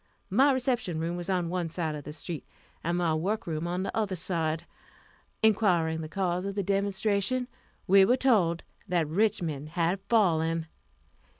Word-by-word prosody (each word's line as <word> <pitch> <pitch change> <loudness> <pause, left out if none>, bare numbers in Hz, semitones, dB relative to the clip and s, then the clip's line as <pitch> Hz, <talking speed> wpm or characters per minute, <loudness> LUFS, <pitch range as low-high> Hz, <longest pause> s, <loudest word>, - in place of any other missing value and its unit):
My 270 +8 +5
reception 245 - 0
room 165 +2 -2
was 175 +1 -5
on 180 -3 +1
one 175 -1 -2
side 160 -1 -2
of 150 -2 -7
the 150 - -6
street, 160 +1 -6 0.4
and 170 +2 0
my 170 -2 +1
work 200 +8 -1
room 160 0 -3
on 180 +2 -1
the - - -4
other 210 -4 0
side. 165 -2 -1 0.8
Inquiring 175 -7 +3
the 155 - -6
cause 180 -1 -1
of 200 0 -4
the 200 - 0
demonstration, 200 +5 0 0.4
we 195 0 +7
were 245 +7 +4
told 190 -11 +3 0.2
that 175 -4 +1
Richmond 160 -5 0
had 170 +3 0
fallen. 165 -7 +3
Mrs. - - -10
180 Hz, 170 wpm, -28 LUFS, 165-200 Hz, 0.8 s, we